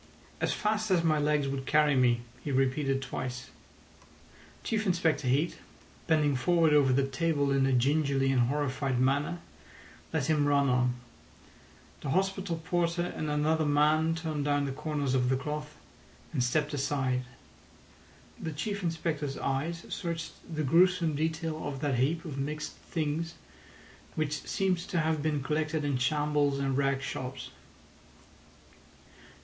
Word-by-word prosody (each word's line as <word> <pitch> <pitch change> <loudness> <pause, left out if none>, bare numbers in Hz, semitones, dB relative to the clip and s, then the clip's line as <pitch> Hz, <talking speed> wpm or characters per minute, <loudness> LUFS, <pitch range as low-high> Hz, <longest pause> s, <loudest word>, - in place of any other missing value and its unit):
"As - - +1
fast 215 0 0
as 180 -3 +3
my 155 -2 +3
legs 150 -1 +1
would 135 -1 -4
carry 150 -2 +4
me," 120 -2 +3 0.2
he 145 - -3
repeated 135 +1 +1
twice. 125 -1 -5 1.1
Chief 220 -2 -1
Inspector 165 -6 +1
Heat, 145 +7 +1 0.5
bending 150 -3 +3
forward 165 +4 +3
over 140 -3 +5
the 135 +1 +3
table 140 +1 0
in 135 -1 +3
a - - +1
gingerly 135 +1 +2
and 125 -3 +3
horrified 135 -2 -1
manner, 140 +6 +1 0.7
let 160 -4 0
him 150 -2 +2
run 140 -1 +3
on. 125 0 +2 1.1
The 140 - -4
hospital 190 0 0
porter 175 0 0
and 155 - -3
another 155 +2 +1
man 155 +2 +3
turned 160 -3 -3
down 145 -1 +1
the 135 - -2
corners 145 -1 -2
of 125 -1 +2
the 130 - +2
cloth, 150 +2 -5 0.6
and 130 -5 +1
stepped 150 +4 0
aside. 135 -2 0 1.2
The 160 - -4
Chief 200 +7 -3
Inspector's 160 -4 -2
eyes 155 +5 -2
searched 165 -1 -4 0.2
the 155 -1 -1
gruesome 170 +2 +4
detail 160 +1 -2
of 140 -2 -4
that 140 -5 0
heap 160 +6 +1
of 140 -4 -5
mixed 150 +2 -3
things, 160 +1 -3 0.8
which 150 -2 -1
seemed 190 -2 +1
to 175 +1 -4
have 160 -1 +1
been 150 -2 0
collected 155 +1 -1
in 140 -3 0
shambles 145 +1 +1
and 135 -1 0
rag 135 0 +1
shops. 130 -1 -5
150 Hz, 145 wpm, -30 LUFS, 135-160 Hz, 1.2 s, over